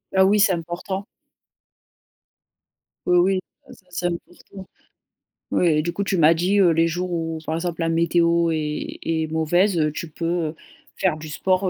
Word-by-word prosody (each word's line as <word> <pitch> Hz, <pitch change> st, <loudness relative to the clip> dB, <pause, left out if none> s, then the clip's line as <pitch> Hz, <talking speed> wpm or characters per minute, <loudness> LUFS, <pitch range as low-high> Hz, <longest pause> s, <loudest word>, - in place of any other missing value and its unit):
Ah 190 Hz, 0 st, +6 dB
oui, 205 Hz, +2 st, +3 dB
c'est 200 Hz, -2 st, +5 dB
important. 175 Hz, +3 st, -4 dB, 2.0 s
Oui 180 Hz, -, +4 dB
oui 185 Hz, +2 st, +3 dB, 0.3 s
c 185 Hz, -, -16 dB
c'est 180 Hz, 0 st, -4 dB
important. 175 Hz, +2 st, -8 dB, 0.8 s
Oui, 155 Hz, -4 st, +2 dB
du 170 Hz, +1 st, -2 dB
coup 200 Hz, +3 st, -2 dB
tu 195 Hz, -2 st, -1 dB
m'as 160 Hz, 0 st, +6 dB
dit, 180 Hz, +5 st, +1 dB
heu, 185 Hz, -3 st, +6 dB
les 165 Hz, +1 st, +3 dB
jours 175 Hz, +2 st, -3 dB
où, 165 Hz, -1 st, -2 dB
par 160 Hz, -, -2 dB
exemple, 170 Hz, 0 st, -3 dB
la 165 Hz, -, +1 dB
météo 170 Hz, 0 st, +2 dB
est 150 Hz, -1 st, -3 dB
est 160 Hz, -1 st, -1 dB
mauvaise, 160 Hz, 0 st, +2 dB
tu 170 Hz, -, -6 dB
peux, 165 Hz, +2 st, -6 dB, 0.2 s
heu, 155 Hz, -, -6 dB, 0.4 s
faire 175 Hz, -5 st, +1 dB
du 155 Hz, 0 st, -9 dB
sport, 185 Hz, +5 st, 0 dB
170 Hz, 165 wpm, -22 LUFS, 160-185 Hz, 2.0 s, Ah